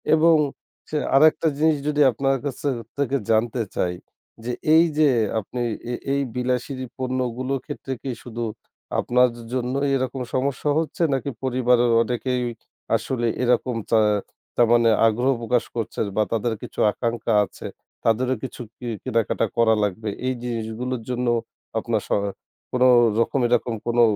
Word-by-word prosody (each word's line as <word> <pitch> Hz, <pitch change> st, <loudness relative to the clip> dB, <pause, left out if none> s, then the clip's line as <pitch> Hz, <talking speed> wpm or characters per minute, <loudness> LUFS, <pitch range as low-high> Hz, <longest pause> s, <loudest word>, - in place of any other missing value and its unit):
এবং 165 Hz, +1 st, +5 dB, 0.5 s
সে 155 Hz, -, -1 dB, 0.2 s
আরেকটা 155 Hz, +3 st, +5 dB
জিনিস 155 Hz, 0 st, +3 dB
যদি 150 Hz, 0 st, +2 dB
আপনার 135 Hz, +4 st, +1 dB
কাছ 135 Hz, -3 st, -3 dB, 0.4 s
থেকে 140 Hz, -1 st, 0 dB
জানতে 115 Hz, +2 st, +2 dB
চাই 90 Hz, -1 st, 0 dB, 0.5 s
যে 120 Hz, -, -2 dB, 0.2 s
এই 165 Hz, -, +7 dB
যে 155 Hz, -2 st, +5 dB, 0.3 s
আপনি 120 Hz, +4 st, -5 dB, 0.3 s
এ -, -, -2 dB, 0.2 s
এই 140 Hz, -, +1 dB
বিলাসী 125 Hz, +2 st, -1 dB, 0.2 s
পণ্যগুলোর 130 Hz, 0 st, -2 dB
ক্ষেত্রে 145 Hz, -2 st, -5 dB
কি 135 Hz, -, -2 dB
শুধু 120 Hz, -1 st, -5 dB, 0.6 s
আপনার 125 Hz, +1 st, +3 dB, 0.2 s
জন্য 125 Hz, 0 st, -1 dB, 0.2 s
এরকম 130 Hz, 0 st, -2 dB
সমস্যা 135 Hz, +2 st, 0 dB
হচ্ছে 165 Hz, +1 st, -2 dB
নাকি 135 Hz, +1 st, -1 dB
পরিবারের 125 Hz, -2 st, +3 dB
অনেকেই 125 Hz, +1 st, -1 dB, 0.5 s
আসলে 120 Hz, +2 st, -1 dB, 0.2 s
এরকম 125 Hz, 0 st, +2 dB, 0.2 s
চা 115 Hz, -, +5 dB, 0.6 s
তারমানে 120 Hz, -1 st, +5 dB, 0.2 s
আগ্রহ 120 Hz, +5 st, +2 dB
প্রকাশ 120 Hz, +1 st, +1 dB
করছে 115 Hz, -2 st, -3 dB, 0.2 s
বা 110 Hz, -, +3 dB
তাদের 115 Hz, +1 st, 0 dB
কিছু -, -, -8 dB
আকাঙ্খা 115 Hz, 0 st, -2 dB
আছে -, -, -9 dB, 0.4 s
তাদেরও 125 Hz, +3 st, +2 dB
কিছু 130 Hz, -, -6 dB, 0.2 s
কি 125 Hz, -, -7 dB, 0.2 s
কিনাকাটা 115 Hz, 0 st, 0 dB
করা 115 Hz, -1 st, +5 dB
লাগবে। 105 Hz, +2 st, -2 dB, 0.2 s
এই 130 Hz, -, +1 dB
জিনিসগুলোর 120 Hz, +1 st, -3 dB
জন্য 125 Hz, 0 st, -1 dB, 0.5 s
আপনার 110 Hz, -1 st, -1 dB
স -, -, -27 dB, 0.6 s
কোন 125 Hz, 0 st, +2 dB, 0.4 s
রকম 115 Hz, +4 st, +1 dB
এরকম 120 Hz, 0 st, +1 dB
কোনো 120 Hz, 0 st, +3 dB
125 Hz, 140 wpm, -23 LUFS, 115-130 Hz, 0.6 s, এই